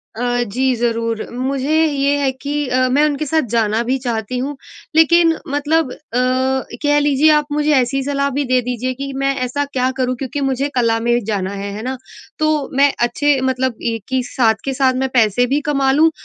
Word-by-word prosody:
अ, 245 +1 0
जी, 255 +4 0
ज़रूर, 230 -1 -1
मुझे 265 +4 -1
ये 285 -2 +1
है 275 -2 +1
कि 280 +2 -6
अ, 255 0 +2
मैं 285 +3 +3
उनके 300 0 -1
साथ 315 +2 +1
जाना 225 -1 +1
भी 265 - +2
चाहती 230 0 -2
हूँ, 275 +4 -3 0.4
लेकिन 330 +1 +5
मतलब 290 0 0
अ, - - -9 0.9
कह 290 0 +3
लीजिए 290 +1 +3
आप 300 -1 +2
मुझे 300 +1 +1
ऐसी 265 +1 +1
सलाह 280 0 0
भी 290 - +1
दे 255 0 +2
दीजिए, 250 +1 -3
कि 275 +2 -6
मैं 275 0 +1
ऐसा 285 +3 -2
क्या 260 -2 -1
करूँ, 255 -1 0
क्योंकि 270 +3 -4
मुझे 270 +2 -1
कला 230 -2 +2
में 240 +1 +1
जाना 200 -3 -2
है, 200 0 -5
है 210 - -6
ना? 260 +1 -3 0.4
तो, 310 -2 0
मैं 280 0 +5 0.2
अच्छे 285 +3 +1
मतलब 255 -1 -1 0.2
एक 225 -3 -6
ही 260 - +2
साथ 230 -2 +1
के 270 - -1
साथ 260 0 +2
मैं 265 - -1
पैसे 235 0 +3
भी 295 - 0
कमा 275 -2 +2
लूँ 315 +4 +4
265 Hz, 200 wpm, -18 LUFS, 245-285 Hz, 0.9 s, लेकिन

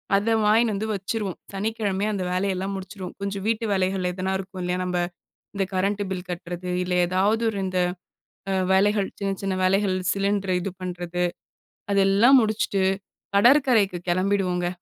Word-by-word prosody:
அத 200 +3 +1 0.2
வாங்கினு 220 +1 +4
வந்து 215 +2 -2
வச்சுருவோம். 200 -1 -3 0.2
சனிக்கிழமையே 205 0 -1
அந்த 190 -2 -2
வேலையெல்லாம் 190 +1 -1
முடிச்சிருவோம் 190 -1 -7
கொஞ்சம் 200 0 -3
வீட்டு 225 0 0
வேலைகள் 185 -1 0
எதுனா 185 +1 -2
இருக்கும் 190 -1 -7
இல்லையா, 180 +1 -1
நம்ம 180 -1 -1 0.6
இந்த 195 -1 0
கரண்ட் 200 +2 0
பில் 185 -1 -4
கட்டுறது 175 +1 -5
இல்ல 180 0 -2
ஏதாவது 195 +5 +1
ஒரு 205 - -4
இந்த 185 -1 -1 0.7
அ 195 - +1 0.2
வேலைகள் 200 +1 +3
சின்ன 200 -1 -1
சின்ன 195 -1 -1
வேலைகள் 190 0 +2 0.2
சிலிண்டர் 195 -1 0
இது 195 - -3
பண்றது 180 -1 -3 0.7
அதெல்லாம் 200 +7 +5
முடிச்சுட்டு, 215 -3 0 0.5
கடற்கரைக்கு 235 -5 +4
கிளம்பிடுவோங்க. 185 -1 +1
195 Hz, 140 wpm, -24 LUFS, 185-205 Hz, 0.7 s, அதெல்லாம்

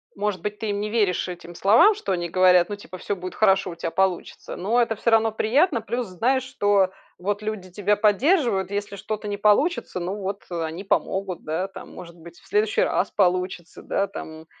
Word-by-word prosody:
может 205 -3 -2
быть, 210 +2 -4
ты 220 - -3
им 200 - -2
не 210 +1 -2
веришь, 205 -6 +1
этим 175 -1 -8
словам, 225 - +5
что 410 - -4
они 175 -1 -2
говорят, 180 0 +4
ну 205 - -3
типа 195 -2 -11
"всё 205 - -3
будет 185 0 -7
хорошо, 195 -3 +3
у - - -8
тя 165 0 -4
получится", 190 -1 -2
но 220 +7 +1
это 230 -2 0
всё 230 +2 0
равно 225 0 +4
приятно. 245 - +2
Плюс 240 0 -3
знаешь, 245 +9 +1
что 205 -6 +2 0.3
вот 205 +3 -2
люди 210 -4 -4
тебя 205 +2 +1
поддерживают, 215 - +2
если 200 0 -3
что-то 215 +1 -5
не 205 0 -3
получится, 210 - +2
ну, 180 +3 -3
вот 200 -1 -5
они 165 +2 -4
помогут, 190 -2 -1
да, 160 +5 -2
там. 195 - -11
Может 170 -1 -11
быть, 170 +1 -14
в - - -22
следующий 210 +1 +1
раз 195 - 0
получится, 180 -2 -1
да, 200 - 0
там, 160 0 -9
200 Hz, 200 wpm, -24 LUFS, 180-215 Hz, 0.3 s, словам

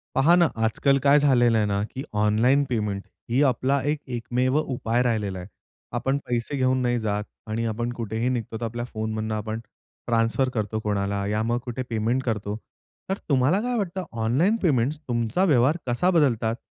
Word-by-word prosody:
पहा 140 +6 +5
ना 175 -1 +5 0.2
आजकाल 135 +5 +2
काय 145 +1 +6
झालेलं 120 -5 +4
आहे 105 - +2
ना, 100 -1 0
की 130 +5 -6
ऑनलाईन 110 +7 +3
पेमेंट 105 -4 -1 0.3
ही 125 +4 +2
आपला 130 +3 +1
एक 150 - -2 0.2
एकमेव 125 +3 0
उपाय 120 -4 -1
राहिलेला 105 -6 -1
आहे. 90 - -8 0.4
आपण 135 +1 0
पैसे 120 +4 -2
घेऊन 130 0 +2
नाही 120 -1 +1
जात 105 -1 -1 0.3
आणि 115 +2 -1
आपण 120 +2 -2
कुठेही 115 0 -2
निघतो 115 -3 -3
तर - - -5
आपल्या 120 +1 -4
फोनमधनं 110 -1 -3
आपण 110 +1 -3 0.5
ट्रान्सफर 115 +2 +2
करतो 110 -1 -2
कोणाला 100 -1 -1
या 105 +1 0
मग 120 +2 0
कुठे 125 +1 -4
पेमेंट 115 +3 0
करतो. 105 -4 -2 0.5
तर 195 - 0
तुम्हाला 140 +8 +3
काय 245 +1 -1
वाटतं 190 -3 -2 0.2
ऑनलाईन 150 - +3
पेमेंट्स 145 -3 +1
तुमचा 120 - 0
व्यवहार 145 -1 +3
कसा 120 +9 +2
बदलतात? 120 -9 +2
120 Hz, 170 wpm, -25 LUFS, 110-135 Hz, 0.5 s, काय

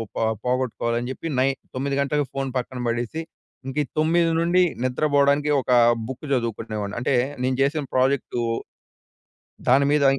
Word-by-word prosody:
పొ - - -2 0.2
పోగొట్టుకోవాలని 125 -1 -1
జెప్పి, 135 - -5
నై 130 - +4 0.3
9 135 +2 -1
గంటలకు 145 +1 +1
ఫోన్ 135 -1 -2
పక్కన 125 0 -4
పడేసి, 120 +7 -2 0.5
ఇంక 140 +3 0
9 165 +2 +3
నుండి 175 +2 +3 0.2
నిద్రబోడానికి 145 +2 +2
ఒకా 125 -1 +3 0.3
బుక్ 130 +3 -7
జదువుకునేవాడిని. 110 -4 -2
అంటే, 125 +2 +1 0.3
నేను 130 0 +1
జేసిన 145 +2 +1
ప్రాజెక్టు 130 -1 +1 1.3
దాని 140 +3 +5
మీద 150 -1 +3
135 Hz, 130 wpm, -23 LUFS, 125-145 Hz, 1.3 s, దాని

